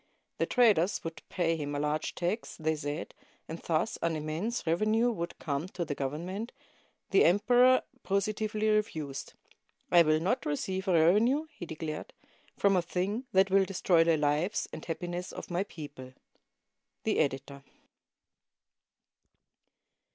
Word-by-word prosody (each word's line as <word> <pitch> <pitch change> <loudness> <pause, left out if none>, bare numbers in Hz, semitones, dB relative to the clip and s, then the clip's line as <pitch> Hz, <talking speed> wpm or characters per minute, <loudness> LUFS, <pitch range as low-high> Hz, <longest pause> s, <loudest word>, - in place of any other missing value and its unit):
The - - +1
traders 210 -7 +3
would 165 0 -6
pay 165 -2 +1
him 145 -2 -4
a - - -1
large 150 +1 -1
tax, 180 +6 -3
they 160 0 0
said, 150 +1 -5 0.3
and 165 +1 -6
thus 165 +6 -1
an 165 -1 0
immense 160 +11 -3
revenue 215 +8 +2
would 170 -6 -5
come 145 +2 -3
to 180 -2 -4
the 150 - -2
Government, 170 - -4 0.6
The 195 - +6
emperor 245 +7 +5 0.2
positively 215 +2 -1
refused, 160 -10 -1 0.6
"I 175 - +8
will 155 -1 +3
not 190 +10 0
receive 190 +6 -2
a 185 - +3
revenue," 210 - +4
he 185 - -9
declared, 155 -1 -6 0.4
"from 200 -1 +3
a 180 - +3
thing 190 +8 -2
that 190 0 +4
will 195 0 +5
destroy 180 -3 +3
the 165 -1 +3
lives 150 +7 0
and 155 - -7
happiness 175 +1 -4
of - - -8
my 175 +2 +1
people," 145 -8 -10 0.9
The - - +1
Editor. 140 -1 -1
175 Hz, 140 wpm, -30 LUFS, 155-205 Hz, 0.9 s, I